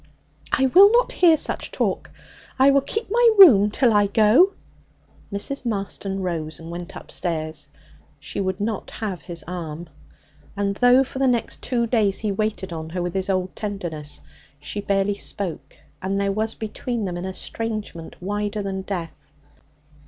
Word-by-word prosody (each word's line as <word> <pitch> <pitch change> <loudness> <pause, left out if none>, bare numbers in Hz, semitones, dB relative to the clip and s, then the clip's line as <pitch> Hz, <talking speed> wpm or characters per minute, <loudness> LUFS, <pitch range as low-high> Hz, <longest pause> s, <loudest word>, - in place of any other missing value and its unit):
'I 265 - +3
will 400 +3 +9
not 485 +2 +3
hear 335 -3 +5
such - - -2
talk. - - -2 0.5
I 270 +1 +6
will 275 0 +4
keep 440 +12 -3
my 475 +1 +5
room 225 - +9
till 235 +2 +2
I 205 -1 +4
go.' 220 - +5 0.8
Mrs. 230 +8 -4
Marston 195 -3 -3
rose 160 -3 -3
and 165 +1 -9
went 175 0 -7
upstairs. 155 -4 -4 0.5
She - - -6
would 190 0 -2
not 210 0 -3
have 200 -5 -5
his 170 -3 -6
arm. 170 -2 -6 0.7
And 200 0 0
though 250 +2 +5
for 265 0 -7
the 270 - +3
next 240 -2 0
two 240 -2 0
days 215 -5 +1
he 215 -2 -2
waited 200 -3 -2
on 160 -1 -6
her 180 +2 -3
with 175 -1 -3
his 190 0 -1
old 185 -1 -1
tenderness, 175 -8 -5 0.4
she 150 +8 -5
barely 200 0 +1
spoke, 200 -3 -3 0.2
and 195 +1 -1
there 200 0 +1
was 220 +2 -1
between 225 +1 -4
them 180 -2 -3
an 175 +1 -5
estrangement 205 -2 -5
wider 205 +2 -3
than 190 -1 -3
death. 180 -4 -6
200 Hz, 160 wpm, -23 LUFS, 180-230 Hz, 0.8 s, will